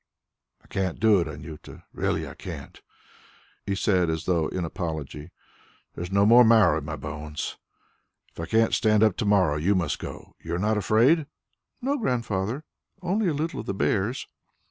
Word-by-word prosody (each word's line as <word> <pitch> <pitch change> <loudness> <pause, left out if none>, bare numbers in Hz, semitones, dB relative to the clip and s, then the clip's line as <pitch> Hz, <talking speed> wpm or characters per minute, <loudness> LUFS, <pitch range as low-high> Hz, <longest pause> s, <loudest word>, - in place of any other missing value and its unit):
"I - - -25
can't 95 -3 -2
do 110 -3 +5
it, 85 - -1
Anjuta, 75 +1 -10
really - - -1
I - - -8
can't," - - -9 0.9
he 100 - 0
said 90 -3 +2
as 80 0 -2
though 85 -4 +1
in 90 -2 -3
apology. 80 -4 -5 0.6
"There - - -5
is 90 - -7
no 100 +1 +4
more 120 +3 +8
marrow 110 -9 +5
in 75 - -9
my - - -4
bones. 75 0 -6 0.7
If - - -16
I 85 - -4
can't 115 0 +2
stand 110 -1 +3
up 110 -4 +4
to 110 - -1
morrow, 95 -7 +3
you 95 +7 +2
must 85 -5 -1
go. - - -8
You 85 +1 -3
are - - -1
not 105 +4 +1
afraid?" 125 - +3 0.6
"No, 280 +2 0
Grandfather... 115 - -1 0.4
only 195 +4 +1
a 165 - +1
little 160 +3 -2
of - - -7
the 100 - -2
bears." 105 +6 0
100 Hz, 180 wpm, -26 LUFS, 85-115 Hz, 0.9 s, more